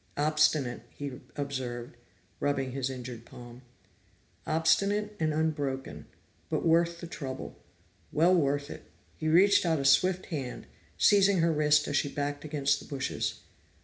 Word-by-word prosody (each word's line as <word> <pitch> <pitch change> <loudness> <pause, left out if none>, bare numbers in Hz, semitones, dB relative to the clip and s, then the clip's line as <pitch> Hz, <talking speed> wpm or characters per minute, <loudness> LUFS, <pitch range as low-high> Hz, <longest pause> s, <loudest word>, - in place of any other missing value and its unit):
"Obstinate," 150 -5 +2
he 140 -3 -7
observed, 130 -4 -4 0.4
rubbing 135 -2 -1
his 135 0 -2
injured 125 -3 -7
palm. 120 +1 -12 0.9
"Obstinate 200 +6 +1
and 155 -1 +1
unbroken 140 - -2 0.4
but - - -1
worth 170 +1 +2
the - - -5
trouble. 135 -6 -6 0.6
Well 165 +5 +4
worth 145 -3 +1
it!" - - -11 0.3
He 155 - -4
reached 185 +6 +5
out 165 -3 +1
a 140 - -3
swift 185 +7 +4
hand, 135 -5 -5 0.3
seizing 200 - +5
her 165 0 +3
wrist 150 -1 +3
as 145 - 0
she 145 - 0
backed 145 0 -3
against 145 -2 0
the - - -12
bushes. 140 -2 -3
145 Hz, 140 wpm, -29 LUFS, 135-165 Hz, 0.9 s, reached